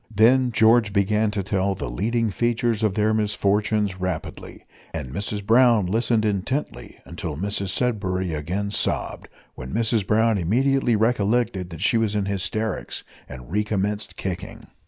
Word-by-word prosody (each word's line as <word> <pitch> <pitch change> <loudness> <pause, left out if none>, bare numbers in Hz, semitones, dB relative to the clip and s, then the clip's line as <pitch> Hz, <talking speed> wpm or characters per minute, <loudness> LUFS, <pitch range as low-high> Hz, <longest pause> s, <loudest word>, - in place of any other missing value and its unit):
Then 120 +4 +4
George 110 -1 +4
began 105 +2 +2
to 105 -2 -2
tell 100 0 0
the - - -5
leading 110 - -1
features 120 0 0
of 105 -3 +1
their 110 0 +2
misfortunes 105 -1 0
rapidly, 90 -3 -5 0.3
and 65 - -5
Mrs 100 0 -3
Brown 115 -2 +5
listened 115 +3 +1
intently 105 +8 -3
until 75 - -6
Mrs 100 +1 -2
Sudberry 95 -6 -1
again 90 +7 -3
sobbed, - - -2 0.3
when 65 0 -8
Mrs 110 -2 0
Brown 110 0 +3
immediately 120 +7 +2
recollected 110 -3 +1
that 80 -3 -9
she 115 - +3
was 110 -2 0
in 100 -2 0
hysterics, 100 +3 -2 0.3
and 65 +3 -10
recommenced 105 0 -1
kicking. 90 -2 -5
105 Hz, 140 wpm, -23 LUFS, 95-115 Hz, 0.3 s, Brown